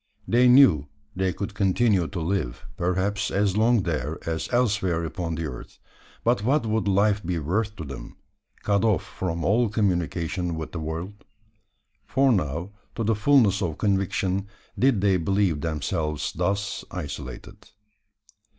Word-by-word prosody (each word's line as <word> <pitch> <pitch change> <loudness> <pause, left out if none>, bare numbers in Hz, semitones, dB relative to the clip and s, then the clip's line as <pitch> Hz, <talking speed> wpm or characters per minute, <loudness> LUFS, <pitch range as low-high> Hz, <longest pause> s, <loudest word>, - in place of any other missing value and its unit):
They 125 +2 +4
knew 125 - +6 0.3
they 95 0 0
could 100 +2 -5
continue 100 -2 +2
to 90 - -5
live, 80 -6 -2
perhaps 95 +3 0
as 100 -1 +1
long 110 -1 +3
there, 85 -4 -2
as 80 -1 -2
elsewhere 100 -9 +1
upon 85 -1 -3
the 80 0 -3
earth; 65 -5 -8 0.5
but 120 -2 +2
what 135 +2 +2
would 110 -2 0
life 100 +1 +2
be 90 0 -2
worth 100 +8 -1
to 85 - -6
them, 70 -4 -9 0.5
cut 100 -1 +2
off 110 -3 +2
from 85 -3 -4
all 115 +3 +3
communication 90 -4 -1
with 80 -1 -5
the 85 - -5
world? 85 +6 -5 0.8
for 135 +1 +3
now, 85 - -1 0.2
to 115 - -2
the 110 +1 +2
fulness 105 -3 +4
of 80 -5 -2
conviction, 95 -1 0 0.3
did 130 -6 +3
they 100 -2 +3
believe 90 -3 +1
themselves 75 -1 -2
thus 95 +4 -1
isolated. 70 - -7
95 Hz, 145 wpm, -25 LUFS, 85-105 Hz, 0.8 s, knew